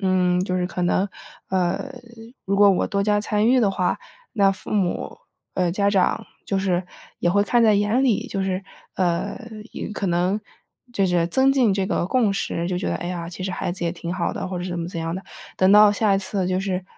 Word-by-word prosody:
嗯， 185 -2 +2
就 185 - -2
是 180 - 0
可 180 -1 -4
能， 185 +3 +1 0.4
呃， 190 +8 -1 0.5
如 195 +1 0
果 205 0 +7
我 185 - +1
多 200 -1 0
加 205 0 +2
参 215 0 +1
与 255 +1 +5
的 210 -5 +3
话， 185 -2 0 0.4
那 200 -2 +4
父 190 - -12
母 195 -4 -1 0.4
呃， 180 -2 +1
家 200 +1 +1
长 195 -2 +1 0.2
就 195 - -1
是 185 -2 0 0.4
也 175 - +2
会 200 +2 +3
看 235 +3 +2
在 220 -2 +5
眼 210 +6 +2
里， 235 -6 +1
就 195 -1 -3
是 190 0 -2 0.3
呃， 175 -2 0 0.6
可 200 - -2
能 180 +4 +1 0.5
就 195 -4 +2
是 175 -2 +2
增 265 +10 +3
进 250 -7 +3
这 195 -1 0
个 175 - 0
共 225 -3 +2
识 170 -3 -2
就 180 -1 -1
觉 - - -3
得， - - -1
哎 175 - -6
呀， 170 -2 -4
其 180 +1 -8
实 190 - -2
孩 175 - -3
子 175 -1 -5
也 170 - +1
挺 175 0 -5
好 175 -2 -1
的， - - -4
或 185 - -4
者 175 - -4
是 185 - -4
怎 175 - -3
么 170 - -3
怎 170 -2 -5
样 165 +1 -3
的， 190 - -5 0.3
等 185 +1 +4
到 210 0 +8
下 205 -1 +2
一 195 - +2
次 190 -1 -2
就 185 0 0
是 185 -1 -2
190 Hz, 245 characters per minute, -23 LUFS, 180-205 Hz, 0.6 s, 到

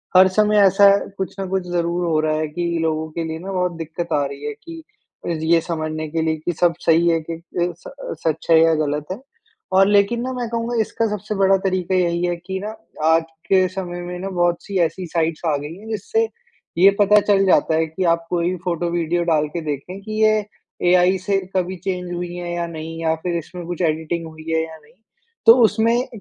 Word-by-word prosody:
हर 185 +1 +8
समय 210 0 +4
ऐसा 195 +1 +6
है 200 0 +2
कुछ 190 0 -4
न 195 - -3
कुछ 190 -1 -1
ज़रूर 175 0 -1
हो 160 -2 +2
रहा 155 0 +1
है 155 - -1
कि 170 +4 -4 0.2
लोगों 160 -1 -1
के 165 +1 -3
लिए 160 0 -4
ना 190 +3 -6
बहुत 180 -1 0
दिक्कत 165 +1 -4
आ 145 -1 +2
रही 140 +1 -7
है 150 - -3
कि 330 -1 -9 0.4
रि 160 -2 -2
ये 165 - +6
समझने 155 -2 -3
के 165 +1 -1
लिए 160 0 +1
कि 175 - 0
सब 170 +1 +2
सही 165 +1 +4
है 165 -1 +2
कि - - -2
ए, 175 +1 -3
स - - -9 0.4
सच 160 0 -2
है 160 - +7
या 165 0 +4
गलत 150 +1 -2
है। 190 - -4 0.6
और 195 +1 +6
लेकिन 205 +3 +3
ना 260 +1 -3
मैं 245 -2 -3
कहूँगा 235 +1 -2
इसका 225 +1 -1
सबसे 210 +1 -5
बड़ा 195 0 +4
तरीका 185 0 0
यही 175 -1 +1
है 175 0 0
कि 190 0 -3
ना 215 +1 -5 0.3
आज 160 0 +4 0.2
के 185 -1 +4
समय 175 -1 -5
में 180 0 -6
ना 195 +2 -4
बहुत-सी 175 +2 -1
ऐसी 185 +2 -8
साइट्स 165 -1 -1
आ 155 -3 +2
गयी 145 +3 -7
है 215 +3 -13
जिससे 450 - 0 0.5
ये 190 +3 +7
पता 210 +1 +6
चल 195 -1 +4
जाता 160 -3 +3
है 160 - +2
कि 160 +4 -4
आप 170 0 -4
कोई 175 +1 0
फ़ोटो 175 -1 -1
वीडियो 175 0 0
डाल 155 -3 +2
के 170 - -1
देखें 150 +6 -5
कि 215 +2 -7
ये 215 0 +5 0.5
एआई 180 +1 +4
से 195 +2 0 0.2
कभी 185 0 0
चेंज 180 -2 -3
हुई 175 0 -4
हैं 175 -1 -5
या 170 - -1
नहीं 165 0 -7
या 160 -1 +1
फ़िर 175 -1 -1
इसमें 175 +2 -7
कुछ 175 +1 -4
एडिटिंग 160 +1 -1
हुई 160 0 -12
है 160 0 +2
या 160 0 -9
नहीं। 155 0 -23 0.5
तो 230 - +11
उसमें 230 +3 +2
175 Hz, 225 wpm, -21 LUFS, 160-195 Hz, 0.6 s, तो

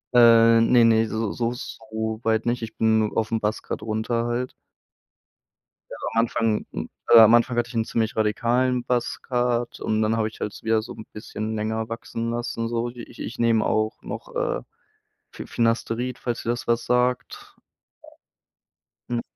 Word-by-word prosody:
Äh, 115 -1 +7
ne, 115 0 +5
ne, 115 0 +4
so 110 -1 -2
so 120 0 -1
soweit 110 -1 -3
nicht. 120 0 0
Ich 110 0 -7
bin 110 -1 +2
aufm 115 0 0
Buzz 105 0 -2
Cut - - -5
runter 115 +2 -1
halt. 120 +2 -2 1.4
Ja - - -7 0.2
am 115 - +2
Anfang 115 -2 0
hm, - - -5 0.2
äh, 115 - +9
am 110 0 +8
Anfang 120 +1 +3
hatte 120 0 +1
ich 120 - -10
'n 115 -1 +1
ziemlich 110 -1 -1
radikalen 120 +4 +1
Buzz 120 0 -1
Cut. 120 -1 -1
Und 110 0 0
dann 110 +1 +1
habe 110 - +1
ich 110 - -11
halt 105 - -3
so - - -12
wieder 110 -1 +2
so 115 - -8
'n 110 - -10
bisschen 110 0 -5
länger 110 +1 -2
wachsen 115 0 -4
lassen, 120 -1 -3
so 120 +1 -1
ich 120 -1 -11
ich 115 - -6
nehme 115 -2 +3
auch 110 +1 0
noch, - - -8
äh, - - -1 0.7
Fi - - -9
Finasterid, 115 +1 -1
falls 120 -2 -3
dir 115 - -3
das 120 0 -2
was 120 0 +1
sagt. 125 0 -1 1.5
Hm. 120 -1 -1
115 Hz, 175 wpm, -24 LUFS, 110-120 Hz, 1.5 s, äh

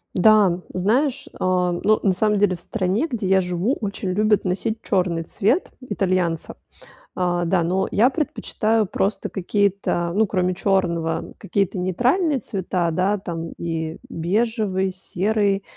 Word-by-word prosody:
Да, 190 -2 +5
знаешь, 255 +9 +1
а, 180 -1 +1
ну, 215 0 +4
на 195 - +2
самом 210 +2 +1
деле 200 -3 +3
в - - -11
стране, 205 - -1
где 235 - -3
я 190 0 +4
живу, 180 +8 -1
очень 200 -2 -3
любят 210 +2 +2
носить 215 +5 -1
черный 180 -4 0
цвет 225 - 0
итальянца. 185 -8 -1 0.6
А, 175 -1 0
да, 175 0 +2
но 185 +3 0
я 240 +6 +4
предпочитаю 225 - 0
просто 200 +3 -1
какие-то, 195 -3 0
ну, 220 +2 +3
кроме 185 -2 0
черного, 175 -4 0
какие-то 195 0 -1
нейтральные 255 - +1
цвета, 185 -4 -2
да, 190 +5 +1
там, 165 -3 -5
и 165 -1 -3
бежевый, 195 +1 0
серый, 195 +2 0
190 Hz, 135 wpm, -22 LUFS, 180-215 Hz, 0.6 s, Да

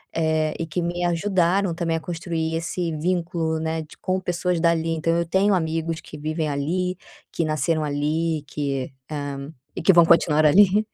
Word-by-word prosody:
eh, 160 -1 +1
e 165 - -3
que 165 +2 -3
me 175 +1 -2
ajudaram 180 +1 +1
também 165 -1 -1
a - - -3
construir 165 -1 -3
esse 165 +1 -2
vínculo, 165 -1 -1
né, 160 0 -2
de 155 - -13
com 185 0 -1
pessoas 180 -1 -1
dali, 165 -1 +2
então 165 +1 0
eu 170 - 0
tenho 190 +4 +2
amigos 165 -2 -1
que 150 - -11
vivem 155 +1 -2
ali, 170 +6 -1 0.3
que 170 - -2
nasceram 155 +1 0
ali 155 +2 -1
que, 140 -1 -3 0.2
hã, 145 -1 -5 0.2
e - - -4
que 185 - +6
vão 170 -2 +7
continuar 155 -2 +4
ali. 200 +6 +5
165 Hz, 175 wpm, -23 LUFS, 155-175 Hz, 0.3 s, vão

